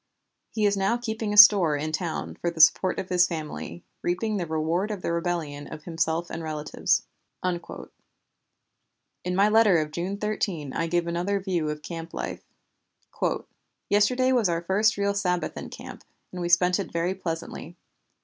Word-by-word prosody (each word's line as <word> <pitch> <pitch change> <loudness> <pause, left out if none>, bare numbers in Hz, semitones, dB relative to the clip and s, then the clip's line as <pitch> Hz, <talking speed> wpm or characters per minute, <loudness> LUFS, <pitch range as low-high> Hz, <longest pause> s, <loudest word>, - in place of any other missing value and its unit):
He 215 -2 -1
is 205 0 +3
now 195 +4 +1
keeping 220 -3 -3
a 210 - -1
store 195 -7 +8
in 155 +2 -3
town 160 +1 -3
for 170 - -2
the 170 -1 -8
support 180 +4 +5
of 185 - -4
his 180 -1 +4
family, 85 - -6 0.2
reaping 210 +5 -1
the 175 -3 -3
reward 160 +5 -1
of 205 -4 -5
the - - -1
rebellion 165 -4 -3
of 155 - -9
himself 165 0 -2
and - - -5
relatives." 155 -1 -1 0.4
In 180 0 -9
my 200 +2 +4
letter 215 -4 +5
of 155 -1 -1
June 180 +5 -3
13 195 -9 -2
I 165 - -1
give 175 +1 0
another 175 +4 -1
view 180 -5 -1
of 150 0 -5
camp 165 0 -7
life: - - -4 1.5
"Yesterday 250 +6 +3
was 235 -7 +3
our 170 0 -1
first 205 +5 +2
real 200 0 +1
Sabbath 180 -3 -1
in - - -7
camp, - - -10 0.3
and 180 - -6
we 175 - -2
spent 180 +2 +4
it 195 - -4
very 170 +2 0
pleasantly. 165 -4 -6
175 Hz, 170 wpm, -26 LUFS, 165-200 Hz, 1.5 s, store